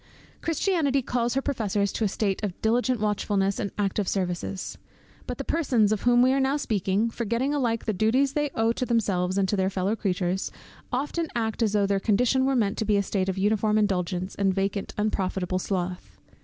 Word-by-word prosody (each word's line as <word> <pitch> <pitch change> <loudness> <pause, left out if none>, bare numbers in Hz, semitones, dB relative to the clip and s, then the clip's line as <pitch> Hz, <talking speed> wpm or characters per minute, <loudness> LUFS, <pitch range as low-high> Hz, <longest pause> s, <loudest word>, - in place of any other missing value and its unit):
Christianity 315 -5 +1
calls 240 0 -1
her 270 - 0
professors 205 -7 0
to - - -2
a - - +3
state 195 0 -1
of 195 -4 -3
diligent 245 +2 +1
watchfulness 205 -2 0
and 200 - -1
active 200 -1 0
services. 185 0 -3 0.5
But - - -4
the - - -3
persons 250 -10 +2
of 215 - 0
whom 245 0 +5
we 260 +1 +4
are 275 - +2
now 270 +2 +2
speaking, 210 -3 0
forgetting 235 +5 -1
alike 235 -6 0
the 215 - 0
duties 250 +8 +2
they 295 -1 0
owe 225 0 +2
to 255 - -2
themselves 195 -5 +1
and 195 -1 +2
to 205 - 0
their 190 -1 +1
fellow 195 +2 -1
creatures, 185 -2 -1 0.4
often 295 +6 -1
act 225 -1 -1
as 215 -2 +2
though 205 -1 +3
their 195 0 +1
condition 245 +6 +2
were 270 - +2
meant 215 -4 +1
to 220 - 0
be 210 -1 +3
a 200 - +2
state 190 -1 -1
of 190 - -2
uniform 210 +2 +2
indulgence, 185 -3 0
and 195 -2 +1
vacant, 195 +1 -1
unprofitable 190 -3 -1
sloth. 180 -1 -4
210 Hz, 195 wpm, -26 LUFS, 195-245 Hz, 0.5 s, whom